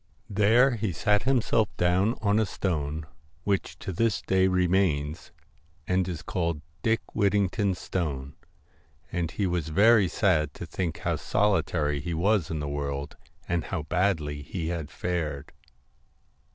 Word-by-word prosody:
There 115 +5 +4
he 105 -2 -1
sat 105 +4 +2
himself 115 -4 +2
down 95 +6 +2
on 105 +1 +3
a 110 - +3
stone, 80 -5 -2 0.4
which 100 0 -1
to 95 - -5
this 115 +3 +1
day 95 0 +3
remains, 90 -5 +1 0.6
and 90 0 +1
is 85 -2 -5
called 85 -5 -2
* 80 - -37
Dick 115 0 +2
Whittington's 100 -1 +1
Stone,' 70 -6 -3
l - - -32 0.6
and 85 -2 -1
he 100 - -2
was 85 -4 -1
very 105 +4 +5
sad 80 -7 +1
to - - -6
think 90 -4 -3
how - - -1
solitary 80 -8 +1
he 85 +3 -3
was 95 +1 +2
in 80 - -2
the 75 - -3
world, 70 0 -3 0.3
and 85 -1 -1
how 90 -5 -3
badly 80 -4 0
he 80 +3 -4
had 80 -4 -3
fared. 80 -6 -3
90 Hz, 150 wpm, -27 LUFS, 75-100 Hz, 0.6 s, very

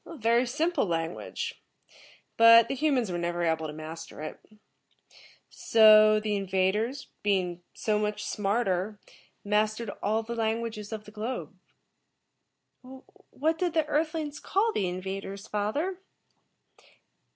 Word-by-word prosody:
"A 330 - -10
very 235 +2 +2
simple 315 - 0
language, 170 - -4 0.7
but 230 0 +8
the 270 - -2
humans 265 -7 +1
were 175 - -2
never 175 0 -2
able 160 -1 0
to - - -6
master 155 +1 -9
it. 155 - -7 1.1
So, 215 -1 +6
the 210 -1 -1
invaders, 200 +7 -1
being 185 -4 0
so 210 -1 0
much 210 0 -2
smarter, 200 -1 -1 0.5
mastered 215 +1 0
all 220 +2 0
the 235 +2 -5
languages 225 -2 -2
of 215 -1 -5
the 210 - -12
globe." 225 +4 -5 1.7
"What 315 +3 -1
did 350 -3 -1
the 320 -2 +3
Earth 310 +2 0
lings 300 -2 -4
call 435 +4 +1
the 190 -3 0
invaders, 195 +2 -6
father?" 290 - -2
215 Hz, 125 wpm, -28 LUFS, 195-255 Hz, 1.7 s, but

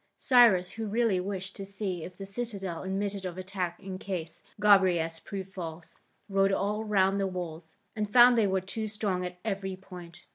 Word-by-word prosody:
Cyrus, 225 -9 +5
who 225 -1 -5
really 220 -3 +2
wished 190 0 -4
to 195 - -5
see 195 -3 -3
if 180 - -8
the 195 - -6
citadel 195 -5 -4
admitted 195 +1 -2
of 180 -1 -5
attack 185 -2 -4
in 190 -1 -7
case 175 -5 -5 0.2
Gobryas 180 -5 +4
proved 190 -2 -7
false, 165 -3 -7 0.3
rode 195 -1 +2
all 205 +2 0
round 200 -2 +2
the 195 - +1
walls, 165 -3 -6 0.2
and 210 -1 -2
found 245 +1 +8
they 220 -3 +3
were 190 0 +1
too 215 +4 -4
strong 205 -4 -2
at 180 0 -5
every 195 -3 -2
point. 180 -3 -11
195 Hz, 180 wpm, -29 LUFS, 180-205 Hz, 0.3 s, found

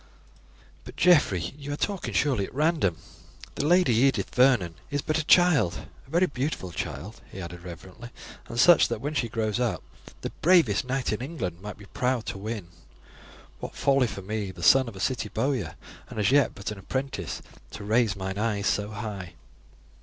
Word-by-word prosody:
"But, - - -11
Geoffrey, 100 - +3
you 145 0 -6
are - - -4
talking 200 +1 -2
surely 130 -9 +2
at - - -15
random. 150 - +2 0.6
The 145 - -1
Lady 175 -6 +4
Edith 135 +4 +2
Vernon 125 -10 +4 0.2
is 145 0 -2
but 155 +1 0
a - - -1
child; 150 - +4 0.2
a - - -19
very 170 +5 +3
beautiful 135 - -3
child," 85 +6 -6
he 95 - -8
added 90 -1 -7
reverently, 90 +7 -10 0.4
"and 115 0 -4
such 175 +6 +7
that 115 -2 -3
when 145 +5 -3
she 120 -6 0
grows 110 0 -1
up, 120 -3 -1 0.4
the - - -4
bravest 160 - +4
knight 130 0 -1
in 105 - -3
England 95 - -4
might 105 +1 -7
be 105 - -13
proud 125 +2 -1
to 95 - -5
win. 105 -4 -5 0.9
What - - -7
folly 135 -2 +3
for 100 -3 -7
me, 105 0 -3
the 95 - -9
son 130 -1 +6
of 115 - -8
a - - -9
city 120 0 -1
bowyer, 115 - -1 0.3
and - - -9
as 105 - +3
yet 145 0 +3
but 100 - -5
an 105 - -7
apprentice, 130 - -4 0.3
to 105 - -8
raise 110 0 +2
mine 95 0 -4
eyes 105 -2 0
so 105 -1 +1
high!" 105 -4 -6
115 Hz, 185 wpm, -27 LUFS, 100-140 Hz, 0.9 s, such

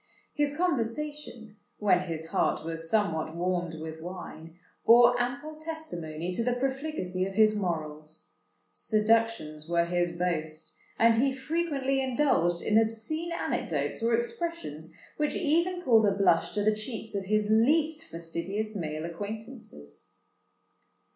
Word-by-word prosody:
His 290 -1 0
conversation, 285 -7 -2 0.2
when 190 -3 +2
his 160 -1 -4
heart 160 - 0
was 165 0 -3
somewhat 165 -7 0
warmed 175 -1 -1
with 160 0 -7
wine, 165 -2 -8 0.3
bore 240 +1 +7
ample 285 +5 -4
testimony 180 - -5
to 205 +6 -1
the 245 +1 +1
profligacy 265 -8 -2
of 195 - -7
his 215 0 +5
morals: 155 -5 -4 0.4
seductions 215 -8 +1
were 170 0 +3
his 175 0 0
boast; 160 -3 -3 0.2
and 230 0 +5
he 275 0 +3
frequently 275 -1 -1
indulged 245 - +1
in 215 0 +4
obscene 225 +10 -2
anecdotes 335 - -2
or 230 0 +3
expressions 235 - -4 0.3
which 300 -1 0
even 345 +4 +1
called 225 -7 +5
a - - +4
blush 200 - +3
to 205 - 0
the 215 +1 +4
cheeks 220 +1 -5
of 200 -1 -2
his 210 +1 +1
least 305 +8 +3
fastidious 175 +6 -4
male 155 -3 -3
acquaintances. 210 - -8
215 Hz, 130 wpm, -29 LUFS, 170-270 Hz, 0.4 s, bore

